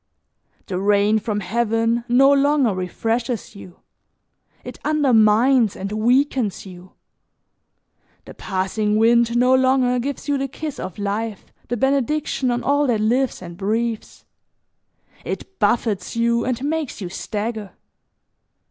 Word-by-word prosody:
The 185 Hz, -1 st, -3 dB
rain 205 Hz, +2 st, +3 dB
from 210 Hz, -1 st, -3 dB
heaven 230 Hz, +3 st, 0 dB
no 265 Hz, +3 st, +5 dB
longer 280 Hz, -4 st, +3 dB
refreshes 225 Hz, +6 st, -3 dB
you, 185 Hz, -3 st, -13 dB, 0.8 s
it -, -, -9 dB
undermines 245 Hz, -5 st, +3 dB
and 195 Hz, +1 st, -5 dB
weakens 240 Hz, 0 st, +1 dB
you. 185 Hz, -1 st, -13 dB, 1.3 s
The -, -, -11 dB
passing 205 Hz, +2 st, -2 dB
wind 235 Hz, +1 st, +3 dB
no 250 Hz, +1 st, +4 dB
longer 260 Hz, -1 st, +3 dB
gives 280 Hz, +3 st, -5 dB
you 285 Hz, -1 st, 0 dB
the 275 Hz, -, -1 dB
kiss 295 Hz, +2 st, -7 dB
of 185 Hz, -, -6 dB
life, 205 Hz, +1 st, -4 dB
the 245 Hz, -, -2 dB
benediction 275 Hz, +1 st, 0 dB
on 240 Hz, 0 st, -1 dB
all 285 Hz, +1 st, +2 dB
that 230 Hz, -4 st, +1 dB
lives 240 Hz, 0 st, 0 dB
and 170 Hz, -1 st, -9 dB
breathes; 220 Hz, +4 st, -3 dB, 1.0 s
it 385 Hz, 0 st, -7 dB
buffets 225 Hz, -4 st, 0 dB
you 235 Hz, 0 st, +1 dB
and 255 Hz, 0 st, -2 dB
makes 305 Hz, -3 st, -3 dB
you 190 Hz, -, -5 dB
stagger. 210 Hz, +2 st, -5 dB
235 Hz, 125 wpm, -21 LUFS, 210-260 Hz, 1.3 s, no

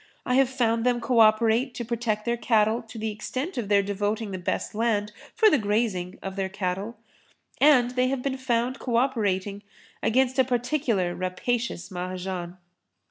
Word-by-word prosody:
I 250 Hz, -, 0 dB
have 265 Hz, 0 st, +4 dB
found 230 Hz, -3 st, 0 dB
them 245 Hz, -1 st, +2 dB
co 240 Hz, 0 st, +1 dB
operate 225 Hz, +3 st, +4 dB
to 240 Hz, -, -4 dB
protect 225 Hz, -2 st, -2 dB
their 235 Hz, 0 st, +1 dB
cattle 225 Hz, -1 st, +2 dB
to 225 Hz, 0 st, -12 dB
the 220 Hz, 0 st, -2 dB
extent 255 Hz, -, -5 dB
of 230 Hz, -6 st, -3 dB
their 200 Hz, -1 st, +4 dB
devoting 205 Hz, +2 st, -2 dB
the 185 Hz, -, -4 dB
best 175 Hz, -, -3 dB
land 210 Hz, -2 st, 0 dB, 0.2 s
for 440 Hz, -, +5 dB
the 305 Hz, -10 st, +4 dB
grazing 205 Hz, -4 st, -1 dB
of 195 Hz, 0 st, -5 dB
their 195 Hz, -1 st, -2 dB
cattle. 195 Hz, +4 st, -3 dB, 0.6 s
And 260 Hz, -4 st, +5 dB
they 250 Hz, 0 st, +1 dB
have 260 Hz, -1 st, -2 dB
been 270 Hz, -1 st, -1 dB
found 250 Hz, 0 st, -1 dB
co 245 Hz, -3 st, -2 dB
operating 205 Hz, -6 st, 0 dB, 0.4 s
against 260 Hz, +3 st, +2 dB
a -, -, +7 dB
particular 245 Hz, -7 st, 0 dB
rapacious 190 Hz, +3 st, -3 dB
Mahajan. 180 Hz, 0 st, -5 dB
225 Hz, 170 wpm, -26 LUFS, 200-250 Hz, 0.6 s, a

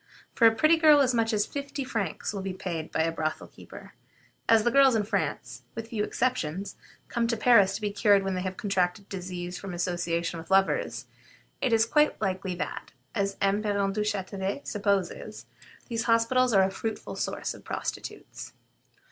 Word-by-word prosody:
For 230 Hz, -, +6 dB
a 225 Hz, -, +3 dB
pretty 310 Hz, +8 st, +4 dB
girl 305 Hz, -2 st, +6 dB
as 260 Hz, -2 st, +3 dB
much 230 Hz, -1 st, +1 dB
as 210 Hz, -1 st, +1 dB
fifty 280 Hz, 0 st, -5 dB
francs 215 Hz, -7 st, -3 dB
will 200 Hz, -, -4 dB
be 190 Hz, -1 st, -4 dB
paid 170 Hz, -4 st, -5 dB
by 160 Hz, -, +1 dB
a 165 Hz, -, 0 dB
brothel 155 Hz, -1 st, -3 dB
keeper. -, -, -13 dB, 0.6 s
As 225 Hz, -1 st, +6 dB
the 240 Hz, -, +2 dB
girls 270 Hz, -1 st, +6 dB
in 215 Hz, -, +2 dB
France, 145 Hz, -, -3 dB
with 225 Hz, 0 st, -6 dB
few 215 Hz, -3 st, -1 dB
exceptions, 200 Hz, -7 st, -2 dB, 0.3 s
come 235 Hz, -1 st, 0 dB
to 230 Hz, -1 st, 0 dB
Paris 210 Hz, -4 st, +5 dB
to -, -, -5 dB
be 210 Hz, -1 st, -1 dB
cured 200 Hz, -1 st, +4 dB
when 195 Hz, 0 st, -1 dB
they 185 Hz, -, -2 dB
have 185 Hz, 0 st, -4 dB
contracted 195 Hz, -1 st, -1 dB
disease 180 Hz, -1 st, -5 dB
from 195 Hz, -3 st, -6 dB
association 170 Hz, -1 st, -2 dB
with 160 Hz, -, -11 dB
lovers, 195 Hz, 0 st, +1 dB, 0.6 s
it -, -, +2 dB
seems 225 Hz, -1 st, +4 dB
quite 300 Hz, +5 st, +2 dB
likely 190 Hz, -2 st, -2 dB
that, 180 Hz, -, -5 dB, 0.2 s
as 200 Hz, -1 st, -1 dB
M. 200 Hz, +1 st, +2 dB
Parent 200 Hz, -2 st, 0 dB
Duchatelet 200 Hz, +1 st, -2 dB
supposes, 200 Hz, -3 st, -2 dB, 0.4 s
these 230 Hz, -1 st, -2 dB
hospitals 240 Hz, +2 st, +3 dB
are 195 Hz, -3 st, +5 dB
a 190 Hz, -, +1 dB
fruitful 220 Hz, +3 st, -5 dB
source -, -, -3 dB
of -, -, -14 dB
prostitutes. -, -, -6 dB
200 Hz, 180 wpm, -27 LUFS, 185-230 Hz, 0.6 s, For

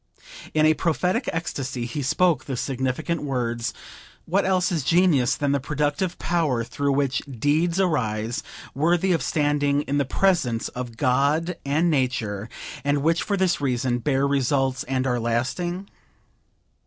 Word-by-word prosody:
In 155 Hz, 0 st, +4 dB
a 155 Hz, -, +6 dB
prophetic 180 Hz, -, 0 dB
ecstasy 140 Hz, -6 st, -3 dB
he 120 Hz, +5 st, -4 dB
spoke 170 Hz, +5 st, +2 dB
the 135 Hz, -3 st, -4 dB
significant 135 Hz, +6 st, -2 dB
words: 120 Hz, -4 st, -2 dB, 0.5 s
"What 190 Hz, +4 st, +1 dB
else 185 Hz, -1 st, +2 dB
is 165 Hz, -5 st, 0 dB
genius 145 Hz, -6 st, +3 dB
than 145 Hz, -1 st, 0 dB
that 140 Hz, -, +2 dB
productive 150 Hz, +6 st, -1 dB
power 155 Hz, -9 st, 0 dB
through 140 Hz, +4 st, -1 dB
which 140 Hz, -1 st, +1 dB
deeds 155 Hz, -, +1 dB
arise, 120 Hz, -, 0 dB, 0.3 s
worthy 170 Hz, +6 st, +2 dB
of 170 Hz, -, +2 dB
standing 145 Hz, -1 st, +1 dB
in 145 Hz, 0 st, -1 dB
the -, -, +3 dB
presence 140 Hz, -6 st, +1 dB
of 125 Hz, -2 st, -7 dB
God 145 Hz, +7 st, +1 dB
and 155 Hz, +5 st, +2 dB
Nature, 115 Hz, -7 st, -1 dB, 0.3 s
and 145 Hz, 0 st, +1 dB
which, 165 Hz, +2 st, +2 dB
for 200 Hz, -, -1 dB
this 185 Hz, -5 st, +1 dB
reason, 125 Hz, -2 st, 0 dB
bear 135 Hz, +2 st, +1 dB
results 135 Hz, -1 st, +1 dB
and 130 Hz, 0 st, -1 dB
are 125 Hz, -2 st, +1 dB
lasting? 150 Hz, +11 st, -2 dB
140 Hz, 145 wpm, -24 LUFS, 125-165 Hz, 0.5 s, a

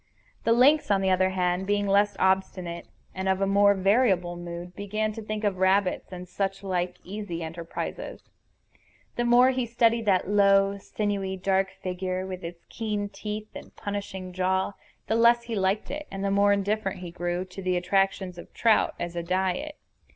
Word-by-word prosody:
The 230 Hz, -, +3 dB
lynx, 275 Hz, +6 st, +5 dB
on 195 Hz, -1 st, +3 dB
the 190 Hz, -1 st, +2 dB
other 185 Hz, 0 st, +3 dB
hand, 180 Hz, 0 st, 0 dB
being 205 Hz, 0 st, +1 dB
less 200 Hz, +1 st, +3 dB
obstinate 185 Hz, -2 st, 0 dB, 0.3 s
and 190 Hz, 0 st, -2 dB
of 190 Hz, +1 st, +1 dB
more 200 Hz, +1 st, +5 dB
variable 190 Hz, -3 st, +2 dB
mood, 175 Hz, +1 st, -7 dB
began 215 Hz, +2 st, -2 dB
to 225 Hz, -, -7 dB
think 215 Hz, 0 st, -4 dB
of 200 Hz, -3 st, 0 dB
rabbits 190 Hz, 0 st, +2 dB
and 180 Hz, 0 st, -7 dB
such 195 Hz, +2 st, -3 dB
like 180 Hz, -2 st, -2 dB
easy 190 Hz, -4 st, -5 dB
enterprises. 165 Hz, +1 st, -6 dB, 0.9 s
The 240 Hz, -, 0 dB
more 245 Hz, +2 st, +6 dB
he 255 Hz, -2 st, -1 dB
studied 230 Hz, -1 st, +2 dB
that 185 Hz, -3 st, +3 dB
low, 200 Hz, 0 st, +4 dB
sinewy, 195 Hz, -2 st, -2 dB
dark 190 Hz, +1 st, +1 dB
figure 185 Hz, 0 st, -3 dB
with 185 Hz, -1 st, -6 dB
its 170 Hz, 0 st, -8 dB
keen 210 Hz, -3 st, -3 dB
teeth 215 Hz, 0 st, -6 dB
and -, -, -11 dB
punishing 200 Hz, -3 st, -5 dB
jaw, 190 Hz, +1 st, 0 dB, 0.3 s
the -, -, -1 dB
less 235 Hz, +1 st, +5 dB
he 235 Hz, -1 st, -6 dB
liked 195 Hz, 0 st, 0 dB
it, 300 Hz, +1 st, -5 dB
and 195 Hz, 0 st, -4 dB
the 195 Hz, -, +1 dB
more 200 Hz, +1 st, +4 dB
indifferent 200 Hz, -1 st, -1 dB
he 175 Hz, -2 st, -7 dB
grew 175 Hz, +1 st, -2 dB
to 185 Hz, +1 st, -9 dB
the 185 Hz, -1 st, 0 dB
attractions 190 Hz, 0 st, 0 dB
of -, -, -12 dB
trout 225 Hz, -2 st, +3 dB
as 175 Hz, 0 st, -4 dB
a 170 Hz, -, -1 dB
diet. 185 Hz, -, -1 dB
195 Hz, 175 wpm, -26 LUFS, 185-210 Hz, 0.9 s, more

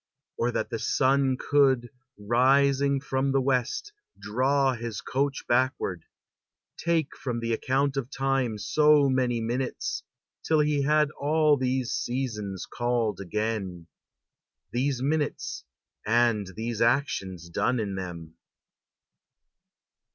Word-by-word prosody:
Or 120 Hz, -, 0 dB
that 120 Hz, -, -2 dB
the 115 Hz, -, -2 dB
sun 135 Hz, +2 st, +2 dB
Could, 135 Hz, -4 st, +2 dB, 0.3 s
rising 135 Hz, +5 st, +3 dB
from 135 Hz, 0 st, -1 dB
the 135 Hz, -, +3 dB
West, 135 Hz, -, -1 dB, 0.2 s
draw 135 Hz, +4 st, +1 dB
his 115 Hz, -3 st, -5 dB
coach 140 Hz, +1 st, -2 dB
backward, 120 Hz, -8 st, 0 dB, 0.7 s
Take 165 Hz, -3 st, -1 dB
from 120 Hz, -3 st, -3 dB
the 115 Hz, 0 st, -1 dB
account 135 Hz, +4 st, 0 dB
of 130 Hz, -2 st, -2 dB
time 135 Hz, -4 st, 0 dB
so 150 Hz, +6 st, +4 dB
many 125 Hz, -3 st, +1 dB
minutes. 130 Hz, -, -2 dB, 0.4 s
Till 155 Hz, -1 st, +2 dB
he 150 Hz, -1 st, +1 dB
had 150 Hz, +1 st, +3 dB
all 155 Hz, +1 st, +3 dB
these 130 Hz, -2 st, -1 dB
seasons 105 Hz, -7 st, -3 dB
called 120 Hz, -3 st, -1 dB
again, 100 Hz, -3 st, -3 dB, 0.9 s
These 130 Hz, +2 st, -1 dB
minutes 150 Hz, +1 st, -2 dB, 0.4 s
and 115 Hz, -2 st, +2 dB
these 115 Hz, 0 st, -3 dB
actions 105 Hz, -, 0 dB
done 120 Hz, +8 st, 0 dB
in 100 Hz, -3 st, -2 dB
them. 85 Hz, -4 st, -6 dB
130 Hz, 115 wpm, -27 LUFS, 115-140 Hz, 0.9 s, so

